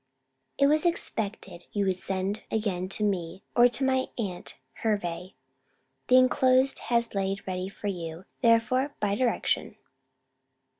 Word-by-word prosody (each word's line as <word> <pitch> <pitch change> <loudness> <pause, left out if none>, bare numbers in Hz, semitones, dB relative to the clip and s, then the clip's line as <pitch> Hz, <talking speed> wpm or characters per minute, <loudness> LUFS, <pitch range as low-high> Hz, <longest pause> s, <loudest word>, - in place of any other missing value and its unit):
It 280 - +4
was 300 +2 +3
expected 215 - -2
you 205 -1 0
would 190 -1 +1
send 195 +3 -1
again 190 -4 -2
to 215 - 0
me, 190 -3 -2
or 240 0 +7
to 245 +3 -2
my 260 0 +1
aunt 190 -7 -5 0.2
Hervey. 185 -4 -2 0.7
The 255 - +5
enclosed 255 +1 +4
has 235 -1 +1
lain 195 0 -1
ready 185 0 -3
for 200 - -12
you, 175 -3 -4 0.2
therefore, 250 +5 +2
by 205 -1 0
direction. 230 -2 0
210 Hz, 135 wpm, -27 LUFS, 190-250 Hz, 0.7 s, or